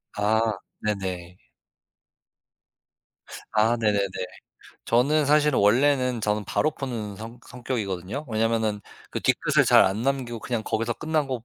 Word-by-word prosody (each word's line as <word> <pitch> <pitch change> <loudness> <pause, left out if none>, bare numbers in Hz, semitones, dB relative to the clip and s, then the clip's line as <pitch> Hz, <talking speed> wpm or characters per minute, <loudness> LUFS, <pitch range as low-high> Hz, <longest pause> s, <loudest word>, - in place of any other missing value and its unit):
아 105 +2 +2 0.4
네네. 95 -4 -3 2.2
아 110 +2 +3
네네네. 105 -2 +2 0.9
저는 145 +6 +3
사실은 150 -1 +3
원래는 125 +3 +3
저는 105 0 -1
바로 155 - +1
푸는 115 -9 -5
성 115 +4 -9
성격이거든요. 115 - -4
왜냐하면은 110 -1 0 0.3
그 - - -3
뒤끝을 - - +2
잘 - - +6
안 95 +4 0
남기고 130 -3 -1
그냥 120 -3 -2
거기서 115 +2 -1
끝나고 145 -6 -2
115 Hz, 260 characters per minute, -25 LUFS, 105-130 Hz, 2.2 s, 잘